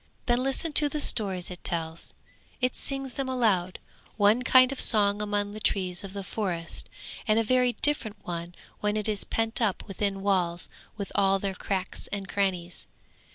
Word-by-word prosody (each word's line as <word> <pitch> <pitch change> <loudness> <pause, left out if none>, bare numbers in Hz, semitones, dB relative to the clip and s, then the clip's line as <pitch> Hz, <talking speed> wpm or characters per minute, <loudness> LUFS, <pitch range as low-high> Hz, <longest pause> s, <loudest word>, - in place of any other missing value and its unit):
Then 240 0 +2
listen 270 +4 0
to 295 0 +7
the 300 - -3
stories 190 -9 +1
it 180 - -9
tells; 165 -1 -2 0.4
it 250 -1 0
sings 270 -2 -2
them 270 0 -3
aloud, 205 -8 +1 0.4
one 210 +3 +4
kind 255 0 +5
of 275 - -1
song 205 -2 +3
among 205 -1 -1
the 215 - -7
trees 185 -3 0
of 195 -1 -8
the 200 -1 -5
forest, 180 -4 -3 0.4
and 215 0 +3
a 225 - +3
very 250 +2 +2
different 245 -8 +4
one 170 0 -6 0.2
when 210 0 0
it 215 - 0
is 210 -2 +1
pent 225 +1 -2
up 210 -3 0
within 195 0 -2
walls 180 -4 0 0.3
with 200 -2 -5
all 195 0 +3
their 195 0 -3
cracks 190 0 -4
and 200 -1 -5
crannies. 185 -4 -2
205 Hz, 175 wpm, -27 LUFS, 190-240 Hz, 0.4 s, to